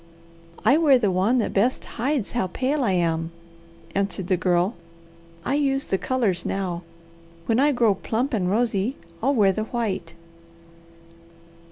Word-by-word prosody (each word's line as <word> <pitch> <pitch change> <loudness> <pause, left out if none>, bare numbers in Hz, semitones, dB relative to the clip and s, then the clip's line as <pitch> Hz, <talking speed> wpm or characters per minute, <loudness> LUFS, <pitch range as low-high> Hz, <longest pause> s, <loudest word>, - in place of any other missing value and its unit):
"I 270 +7 +6
wear 290 -5 +6
the 210 -6 +1
one 195 +7 +2
that 230 - 0
best 235 +6 +1
hides 255 -1 -2
how 215 -6 0
pale 265 - -1
I 200 -6 +1
am," 165 -2 0 0.6
answered 195 -2 -2
the 185 - +4
Girl. 180 +3 +1 0.7
"I - - 0
use 275 -1 +1
the 190 - -1
colours 230 -9 0
now. 185 -3 -2 0.6
When 225 +5 +2
I 290 +2 +4
grow 235 -6 +3
plump 240 +7 -2
and 185 -5 0
rosy, 225 +2 0 0.3
I'll 275 +4 +2
wear 200 -4 +4
the 215 +3 -3
white." 195 -8 -3
215 Hz, 150 wpm, -24 LUFS, 185-255 Hz, 0.7 s, I